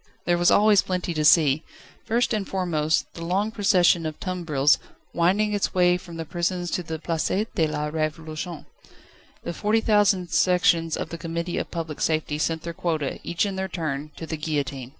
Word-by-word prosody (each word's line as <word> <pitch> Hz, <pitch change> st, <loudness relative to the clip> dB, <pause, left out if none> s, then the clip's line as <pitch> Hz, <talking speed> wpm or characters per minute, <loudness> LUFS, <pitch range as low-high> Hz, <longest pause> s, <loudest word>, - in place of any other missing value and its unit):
There 175 Hz, 0 st, +2 dB
was 175 Hz, -, +4 dB
always 210 Hz, -1 st, +5 dB
plenty 180 Hz, -2 st, -3 dB
to 155 Hz, -1 st, -1 dB
see: 150 Hz, -2 st, +5 dB, 0.4 s
first 235 Hz, +2 st, +1 dB
and 210 Hz, -3 st, -2 dB
foremost, 165 Hz, -5 st, 0 dB
the 165 Hz, -, -8 dB
long 195 Hz, +5 st, 0 dB
procession 180 Hz, -6 st, +3 dB
of 155 Hz, -, -7 dB
tumbrils, 155 Hz, -6 st, +1 dB, 0.3 s
winding 200 Hz, +5 st, +2 dB
its 205 Hz, -2 st, -1 dB
way 180 Hz, -1 st, +4 dB
from 175 Hz, -2 st, -8 dB
the 165 Hz, -, -4 dB
prisons 175 Hz, +2 st, -2 dB
to -, -, -1 dB
the 160 Hz, -2 st, -5 dB
Place 165 Hz, 0 st, -2 dB, 0.3 s
de 160 Hz, -, +2 dB
la 150 Hz, 0 st, -3 dB
Révolution. 155 Hz, +1 st, -4 dB, 0.8 s
The -, -, -4 dB
forty 215 Hz, +4 st, +1 dB
four -, -, -8 dB
thousand 200 Hz, -5 st, +3 dB
sections 165 Hz, -1 st, +3 dB
of -, -, -4 dB
the 170 Hz, -, -7 dB
Committee 170 Hz, +1 st, -3 dB
of -, -, -4 dB
Public 165 Hz, -3 st, -5 dB
Safety 155 Hz, -2 st, 0 dB
sent 160 Hz, +1 st, -1 dB
their 170 Hz, -, -5 dB
quota, 165 Hz, -5 st, -2 dB
each 170 Hz, +4 st, 0 dB
in 195 Hz, -2 st, -3 dB
their 190 Hz, 0 st, -2 dB
turn, 155 Hz, -5 st, -4 dB
to 165 Hz, -, -7 dB
the 160 Hz, 0 st, -4 dB
guillotine. 140 Hz, -4 st, -3 dB
170 Hz, 190 wpm, -24 LUFS, 155-185 Hz, 0.8 s, always